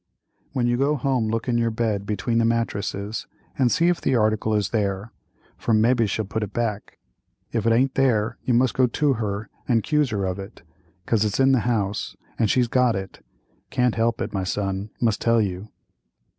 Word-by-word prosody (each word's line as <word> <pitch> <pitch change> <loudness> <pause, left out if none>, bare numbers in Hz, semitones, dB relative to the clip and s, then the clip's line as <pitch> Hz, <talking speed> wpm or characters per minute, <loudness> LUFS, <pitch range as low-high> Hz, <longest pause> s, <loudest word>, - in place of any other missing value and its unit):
"When 125 -3 0
you 120 0 +1
go 140 +3 +2
home 130 -4 0
look 115 +2 -2
in 120 -1 +1
your 115 0 +2
bed 110 -3 -1
between 115 +2 0
the - - +3
mattresses 110 -2 -2 0.3
and 125 -3 +2
see 170 - +3
if 175 -1 +1
the 135 - +1
article 110 -1 +1
is 105 -2 0
there, 100 0 -1 0.5
for 115 - +1
mebbe 115 +1 +3
she'll 110 +2 -1
put 110 +3 -3
it 105 -2 -4
back—if 110 - -5
it - - +4
aint 130 +4 +3
there 115 -4 +1
you 125 - +1
must 125 +1 +3
go 130 -1 +3
to 145 +4 +1
her 105 -2 -3 0.2
and 115 -4 +2
'cuse 150 -3 +1
her 100 -4 -1
of 95 +1 -3
it, 100 +1 -10 0.4
'cause 110 0 +2
it's 105 +1 -1
in 135 0 +5
the 130 - +4
house 105 -4 -1 0.2
and 110 - +2
she's 125 +1 +3
got 125 -1 +2
it—can't 95 - -4
help 115 0 0
it, - - -3
my 95 -2 -1
son, 95 +1 -2
must 115 -3 +1
tell 115 0 +3
you." 100 0 -2
115 Hz, 195 wpm, -24 LUFS, 105-125 Hz, 0.5 s, in